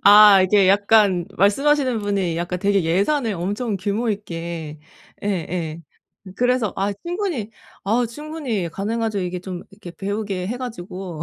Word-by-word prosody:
아 205 -2 +9
이게 195 0 +4
약간 200 -3 +4
말씀하시는 255 - +3
분이 195 -5 -1
약간 175 +1 -2
되게 200 0 +2
예산을 210 - +1
엄청 205 +5 -2
규모있게. 170 -7 -3 0.4
예예. 170 -4 -3 0.6
그래서 245 -4 +1
아 200 +1 0
충분히, 340 - -3 0.3
아 230 +5 +2
충분히 260 - -4
가능하죠. 215 +3 -2
이게 180 0 -3
좀 185 -1 -6
이렇게 195 -3 -11
좀 - - -33
배우게 200 -2 -3
해가지고. 190 -9 -6
200 Hz, 300 characters per minute, -22 LUFS, 180-225 Hz, 0.6 s, 아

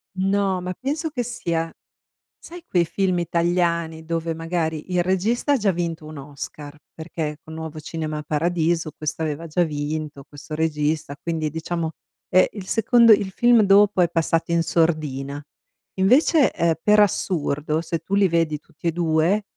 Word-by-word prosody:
No, 195 0 +1
ma 180 +1 -4
penso 295 - -3
che 250 -5 -3
sia 170 -9 -2 0.7
sai, 345 0 -11
quei 175 - +2
film 185 +1 0
italiani 170 -1 0
dove, 165 0 -2
magari, 165 0 -3
il 175 - +2
regista 205 +10 +1
ha - - +3
già 210 -4 +2
vinto 170 -3 -3
un 155 0 -9
Oscar, 145 +1 -8 0.2
perché 160 -2 -5
con 160 - -11
Nuovo 160 -1 -6
Cinema 155 -1 -4
Paradiso, 165 +1 0
questo 155 +1 -4
aveva 155 +1 -3
già 170 +3 +1
vinto, 150 -2 -4
questo 145 +2 -9
regista, 150 -2 -1
quindi, 160 -2 -2
diciamo, 160 +1 -3 0.4
è 185 0 +5
il 200 -3 -7
secondo 230 +2 +5
il 200 -2 +4
film 240 +1 +4
dopo 200 -1 +5
è 175 - +3
passato 165 0 0
in 170 - +3
sordina. 150 -4 -1 0.5
Invece, 260 - +4
ehm, 170 -1 +1
per 210 0 +4
assurdo, 155 -5 0
se 165 0 -3
tu 190 +5 -3
li 200 -2 +4
vedi 165 -3 +1
tutti 160 +3 -8
e - - +3
2, 170 +4 +1
165 Hz, 160 wpm, -23 LUFS, 155-190 Hz, 0.7 s, è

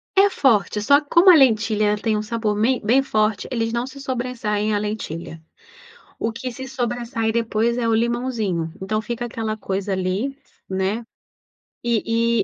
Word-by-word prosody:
É 395 +1 +6
forte, 220 - +2
só 285 +7 +5
que 290 - -17
como 345 +3 +6
a - - +8
lentilha 215 -6 +3
tem 215 0 0
um - - -1
sabor 215 -1 -2
bem 250 +4 +2
bem 240 +6 +4
forte, 215 -5 0
eles 225 -2 -1
não 235 +1 -1
se 275 +1 -10
sobressaem 235 -5 -2
à - - +2
lentilha, 185 -6 -5 0.8
o 225 - -1
que 255 +3 -5
se 260 +3 -7
sobressai 240 -3 -2
depois 230 0 0
é 235 -2 0
o 225 - +3
limãozinho, 225 -8 -1
então 215 +3 -1
fica 235 +2 -4
aquela 225 -2 -3
coisa 195 -1 -3
ali, 190 +9 -1 0.3
né, 190 +5 -1 0.8
e 230 0 +1
225 Hz, 165 wpm, -22 LUFS, 210-245 Hz, 0.8 s, a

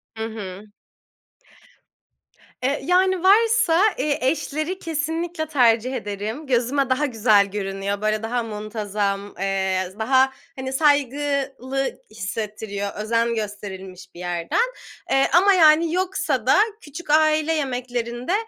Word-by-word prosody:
Hı 220 - -4
hı. 210 -2 -7 1.9
E, 255 - +1 0.2
yani, 370 +1 +2
varsa, 415 -3 +4 0.2
eee, 295 -1 0
eşleri 310 +6 -1
kesinlikle 325 +1 -3
tercih 250 -3 +2
ederim, 220 +5 -5
gözüme 260 +2 +1
daha 260 +3 +2
güzel 215 -5 +3
görünüyor, 200 0 -3
böyle, 215 0 0
daha 235 +1 -1
muntazam, 210 -2 -3
eee, 190 -1 -1
daha, 260 +3 +3 0.2
hani, 260 0 -5
saygılı 275 -2 0
hissettiriyor, 210 -1 -5
özen 230 +2 0
gösterilmiş 190 -3 -7
bir - - -11
yerden. 180 - -1 0.4
Eee, 270 0 +4
ama, 390 +3 +6
yani, 325 -1 +5
yoksa 355 - -1
da, 265 - +5 0.2
küçük 295 +2 -10
aile 310 +1 +3
yemeklerinde, 245 -1 -3
250 Hz, 110 wpm, -22 LUFS, 210-305 Hz, 1.9 s, ama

